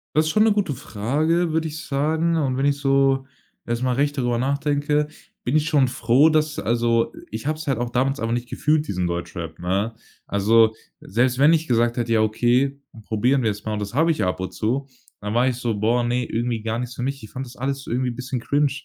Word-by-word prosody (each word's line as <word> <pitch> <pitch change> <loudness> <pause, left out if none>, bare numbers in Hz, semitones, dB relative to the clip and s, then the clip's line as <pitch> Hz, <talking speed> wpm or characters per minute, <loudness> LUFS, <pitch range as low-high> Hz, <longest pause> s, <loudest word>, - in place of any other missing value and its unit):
Das 155 +1 +3
ist - - +1
schon 215 - +4
'ne 220 -1 +4
gute 200 -8 0
Frage, 150 +8 0
würde 160 0 0
ich 155 0 -7
sagen. 160 +4 +1
Und 135 -4 0
wenn 135 - -1
ich 145 0 +2
so 135 -1 +2 0.4
erst 120 +1 -2
mal 130 - +1
recht 145 +2 0
darüber 120 -2 0
nachdenke, 145 +3 0 0.3
bin 130 +5 +2
ich 155 - +1
schon 145 -5 +3
froh, 125 +5 +4
dass 155 -1 +1
also, 115 0 +1 0.2
ich 110 +3 -5
habe 155 0 0
es 155 - -8
halt 135 -5 0
auch 120 0 -2
damals 135 +3 0
aber 115 0 -1
nicht 120 +1 -2
gefühlt, 150 0 +1
diesen 90 -2 -1
Deutschrap, 85 -1 -5
ne? 95 +6 -1 0.3
Also, 110 +2 +4 0.3
selbst 125 +4 +1
wenn 145 +3 +6
ich 160 -1 +2
gesagt 120 0 +2
hätte: 120 -1 0
„Ja 110 - +4
okay, 120 +5 +1 0.3
probieren 125 +5 +1
wir's 105 -2 -2
mal“ 110 - -2
und 105 - -2
das 100 +1 -5
habe 160 +6 +3
ich 155 - -1
ab 90 0 -1
und 95 - -4
zu, 130 +6 -1 0.3
dann 105 +1 -4
war 125 +3 +3
ich 125 - -3
so: 120 -4 -2
„Boah, 120 +3 +1
ne, 125 +1 0
irgendwie 115 -1 -2
gar 115 +1 -2
nichts 125 0 -5
für 125 - -4
mich.“ 135 +1 -3
Ich 110 - -10
fand 130 +1 -5
das 125 +1 -13
alles 135 +2 -3
irgendwie 125 +1 -1
'n - - -8
bisschen 130 +1 -4
cringe 145 +4 +1
125 Hz, 230 wpm, -23 LUFS, 115-145 Hz, 0.4 s, wenn